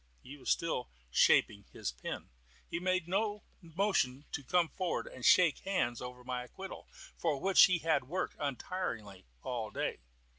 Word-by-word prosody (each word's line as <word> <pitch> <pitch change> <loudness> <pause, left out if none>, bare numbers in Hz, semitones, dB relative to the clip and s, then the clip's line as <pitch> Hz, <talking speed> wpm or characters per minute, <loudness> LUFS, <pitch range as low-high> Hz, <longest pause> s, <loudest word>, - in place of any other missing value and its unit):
He 135 - -9
was 140 - -6
still 160 -7 0 0.2
shaping 100 +9 +4
his - - -3
pen. - - -7 0.4
He 165 - -3
made 185 -1 0
no 205 +3 0 0.2
motion 165 -6 0
to 145 - -4
come 175 +3 +3
forward 185 -2 -2
and 125 - -10
shake 170 -1 +6
hands 120 -12 -1
over 125 0 -8
my 125 0 -3
acquittal, 190 +9 -9 0.3
for 155 -5 0
which 195 +3 +7
he 180 -2 +2
had 160 -4 +1
worked 180 +8 -2
untiringly 120 - -4 0.2
all 115 -4 -3
day. - - -2
150 Hz, 155 wpm, -33 LUFS, 125-185 Hz, 0.4 s, which